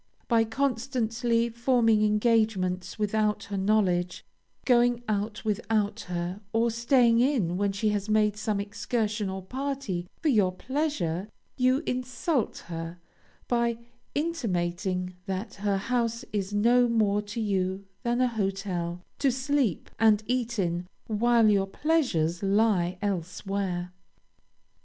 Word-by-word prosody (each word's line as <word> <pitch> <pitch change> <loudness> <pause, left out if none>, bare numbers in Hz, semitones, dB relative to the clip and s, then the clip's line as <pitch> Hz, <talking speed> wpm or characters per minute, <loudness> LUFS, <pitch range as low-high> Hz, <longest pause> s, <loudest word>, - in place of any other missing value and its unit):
By 230 -2 +3
constantly 235 -1 0
forming 235 -2 +3
engagements 210 -4 +1
without 210 0 0
her 200 - -6
knowledge, 190 -3 +1 0.4
going 245 -1 +3
out 210 +1 -2
without 210 0 0
her, 175 +3 -3
or 230 +1 +2
staying 235 0 +4
in 240 - +2
when 200 +1 +1
she 200 +2 0
has 205 0 -2
made 210 -1 +3
some 210 -1 -1
excursion 210 0 -2
or 190 0 -5
party 260 -6 -3
for 320 - +1
your 200 -8 +3
pleasure, 210 - -2 0.3
you 255 +3 +2
insult 250 +1 -1
her, 165 0 -6 0.5
by 235 -1 +1 0.4
intimating 185 - -1
that 195 +3 -3
her 200 -1 +1
house 235 +3 -1
is 200 -1 -1
no 240 +4 +4
more 210 -3 +2
to 210 +2 -6
you 195 -2 -1 0.2
than 240 0 0
a 255 - +4
hotel, 190 -5 -2 0.2
to 275 -2 +3
sleep 260 - 0
and 215 -1 +4
eat 240 0 -1
in, 175 -2 -1 0.2
while 230 +1 +3
your 200 -2 +3
pleasures 195 - 0
lie 195 -3 +2
elsewhere. 185 -1 -2
215 Hz, 125 wpm, -27 LUFS, 190-235 Hz, 0.5 s, staying